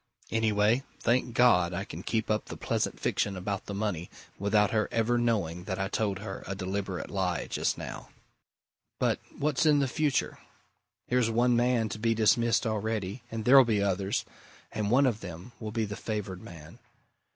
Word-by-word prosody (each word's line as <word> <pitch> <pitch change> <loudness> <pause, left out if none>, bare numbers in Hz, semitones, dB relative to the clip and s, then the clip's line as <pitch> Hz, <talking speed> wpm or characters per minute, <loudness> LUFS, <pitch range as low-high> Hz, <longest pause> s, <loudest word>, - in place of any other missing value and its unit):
Anyway, 110 +1 +2 0.2
thank 120 0 +1
God 90 -8 +4
I 95 +3 -3
can - - -8
keep 110 -1 -1
up 110 - 0
the - - -8
pleasant - - -1
fiction 100 -2 0
about 100 +2 -4
the 100 - -4
money 100 -5 -2 0.3
without 105 +1 +3
her 110 -2 +1
ever 115 +1 +1
knowing 95 -8 0
that 95 -1 -3
I 95 0 -2
told 105 -3 -1
her 95 -1 -7
a 100 - -3
deliberate 95 -1 -4
lie 90 -3 -1
just - - -1
now. - - -7 0.9
But - - +1 0.2
what's 145 -2 +1
in 150 -2 +5
the 140 -1 +2
future? 145 +1 0 0.7
Here's 125 -2 +2
one 120 +2 +3
man 120 -1 +2
to 110 - -5
be 115 +1 +1
dismissed 115 +1 +3
already, 110 0 -2
and 115 -2 -5
there'll 135 +1 +9
be 110 -4 +1
others, 95 0 0 0.5
and 105 -1 -2
one 135 +5 +5
of 120 -5 +1
them 90 +5 -9
will 110 - -5
be 110 0 0
the 105 0 -5
favoured 100 -5 -4
man. 80 -3 -12
110 Hz, 175 wpm, -29 LUFS, 95-120 Hz, 0.9 s, there'll